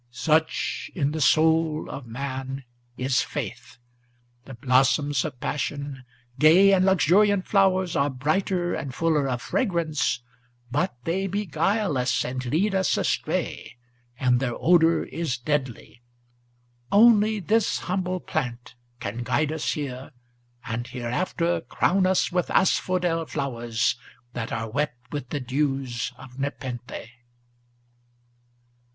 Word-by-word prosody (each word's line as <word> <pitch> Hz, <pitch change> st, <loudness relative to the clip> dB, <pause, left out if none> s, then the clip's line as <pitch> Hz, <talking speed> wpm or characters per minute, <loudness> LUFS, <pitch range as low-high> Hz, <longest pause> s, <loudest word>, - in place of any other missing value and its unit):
Such 155 Hz, +6 st, 0 dB
in 145 Hz, -5 st, 0 dB
the 155 Hz, 0 st, -3 dB
soul 160 Hz, +1 st, +3 dB
of 135 Hz, -3 st, -7 dB
man 135 Hz, +2 st, -5 dB, 0.3 s
is 130 Hz, 0 st, +1 dB
faith. -, -, -6 dB, 0.7 s
The 135 Hz, -, -9 dB
blossoms 135 Hz, +3 st, +2 dB
of 130 Hz, -4 st, -6 dB
passion, 140 Hz, -1 st, -4 dB, 0.3 s
Gay 180 Hz, +7 st, +7 dB
and 185 Hz, -1 st, +4 dB
luxuriant 190 Hz, +2 st, +4 dB
flowers, 190 Hz, -3 st, +2 dB
are 140 Hz, +1 st, +2 dB
brighter 175 Hz, +7 st, 0 dB
and 135 Hz, -2 st, -4 dB
fuller 155 Hz, -4 st, +1 dB
of 125 Hz, -1 st, -3 dB
fragrance, 165 Hz, -, 0 dB, 0.5 s
But 145 Hz, +3 st, 0 dB
they 190 Hz, +4 st, -1 dB
beguile 190 Hz, -, 0 dB
us, 125 Hz, -1 st, +1 dB
and 125 Hz, +1 st, -4 dB
lead 175 Hz, -, +1 dB
us 190 Hz, -1 st, +2 dB
astray, -, -, -2 dB, 0.4 s
and 125 Hz, -1 st, +3 dB
their 125 Hz, -2 st, -2 dB
odor 165 Hz, -1 st, +4 dB
is 160 Hz, -7 st, -3 dB
deadly. 125 Hz, -4 st, -3 dB, 0.9 s
Only 215 Hz, 0 st, +5 dB
this 210 Hz, +4 st, +1 dB
humble 185 Hz, 0 st, -2 dB
plant 120 Hz, -1 st, -4 dB, 0.3 s
can 115 Hz, +1 st, -4 dB
guide 140 Hz, +5 st, 0 dB
us 160 Hz, -1 st, -1 dB
here, 135 Hz, -3 st, -6 dB, 0.5 s
and 120 Hz, -1 st, -3 dB
hereafter 165 Hz, +8 st, -1 dB
Crown 185 Hz, +3 st, +1 dB
us 185 Hz, -1 st, +2 dB
with 180 Hz, -1 st, 0 dB
asphodel 175 Hz, -3 st, +1 dB
flowers, 120 Hz, -4 st, -1 dB, 0.4 s
that 115 Hz, -2 st, -4 dB
are 115 Hz, 0 st, -2 dB
wet 145 Hz, +2 st, -2 dB
with 145 Hz, -4 st, -5 dB
the 145 Hz, -, -2 dB
dews 135 Hz, -1 st, -1 dB
of 130 Hz, 0 st, -12 dB
nepenthe." 125 Hz, -4 st, -5 dB
145 Hz, 120 wpm, -25 LUFS, 125-180 Hz, 0.9 s, Gay